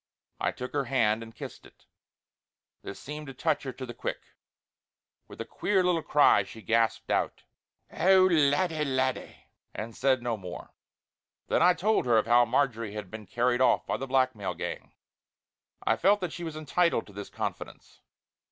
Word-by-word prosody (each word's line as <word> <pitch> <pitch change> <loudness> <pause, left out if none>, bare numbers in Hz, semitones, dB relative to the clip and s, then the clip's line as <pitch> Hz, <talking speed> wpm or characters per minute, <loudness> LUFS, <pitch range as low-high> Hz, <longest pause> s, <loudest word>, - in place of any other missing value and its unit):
I - - 0
took 125 0 -7
her 140 -2 0
hand 115 -4 +1
and 115 0 -11
kissed - - -9
it. - - -20 1.0
This 100 - -8
seemed 150 +1 -7
to 135 - -9
touch 155 +2 0
her 135 - -5
to 130 +1 -7
the 120 - -8
quick; - - -4 1.1
with - - -13
a - - -4
queer 195 -2 0
little 180 -2 +2
cry 150 -8 +4
she 105 +3 -10
gasped 115 0 +1
out: - - -1 0.5
"Oh, 190 0 +5
laddie, 160 -1 +2
laddie!" 130 -2 -2 0.2
and 110 +1 -6
said 130 -2 +1
no 120 -2 -1
more. 90 -3 -9 0.8
Then - - +2
I 180 +1 +5
told 210 -5 +1
her 115 -2 +4
of 110 - +2
how 120 +1 +5
Marjory 115 -4 0
had 105 -4 -7
been 110 -2 -9
carried 120 +4 +1
off 125 -2 +3
by - - -2
the 135 - -5
blackmail 130 -8 0
gang; - - -6 0.9
I - - +2
felt 200 +3 +4
that 180 -3 -3
she 175 - -6
was 160 -2 -5
entitled 155 -2 +1
to 100 - -16
this 100 0 -7
confidence. - - -7
130 Hz, 175 wpm, -28 LUFS, 115-155 Hz, 1.1 s, Oh